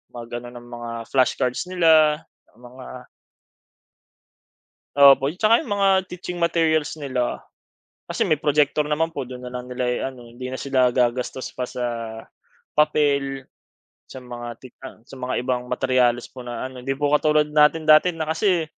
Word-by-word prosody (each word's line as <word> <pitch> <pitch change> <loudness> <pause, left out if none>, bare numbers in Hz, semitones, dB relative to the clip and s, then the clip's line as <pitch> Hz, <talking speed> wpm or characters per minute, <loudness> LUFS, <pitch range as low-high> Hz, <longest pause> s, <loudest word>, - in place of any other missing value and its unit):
mag-ano 120 0 -7
ang 120 - -10
mga 120 0 -7 0.2
flashcards 130 +3 +1
nila 160 -3 +4 0.2
tsaka - - -31
mga 125 +1 -12 2.1
Opo. 140 -1 +7
'Tsaka 215 +5 +4
iyong 235 -9 -3
mga 200 -1 +3 0.2
teaching 180 0 -7
materials 160 -2 +1
nila 130 -3 -2 0.7
kasi - - 0
may 155 - +3
projector 150 0 +2
naman 155 +2 -1
po, 140 - -3
do'n 125 0 -8
na 125 - -8
lang 125 0 -6
nila 125 0 -2
i-ano. 125 0 -3
Hindi 125 +2 -8
na 130 - -5
sila 130 -2 +2
gagastos 125 +1 -1
pa 125 - -4
sa 125 0 -4 0.9
papel, 140 -3 +1 0.6
sa 130 -1 -10
mga 120 -1 -8
ti 130 - -12 0.2
ah, 130 - -10
sa 135 - -13
mga 125 -1 -2
ibang 125 -1 -2
materyales 125 -1 +1
po 125 -2 -10
na 120 - -5
ano. 130 - -10
'Di 135 +2 -3
po 145 +1 -1
katulad 150 0 +3
natin 150 +1 +4
dati 155 +3 +5
na 160 -1 -3
kasi 175 0 +1
135 Hz, 155 wpm, -22 LUFS, 125-155 Hz, 2.1 s, Opo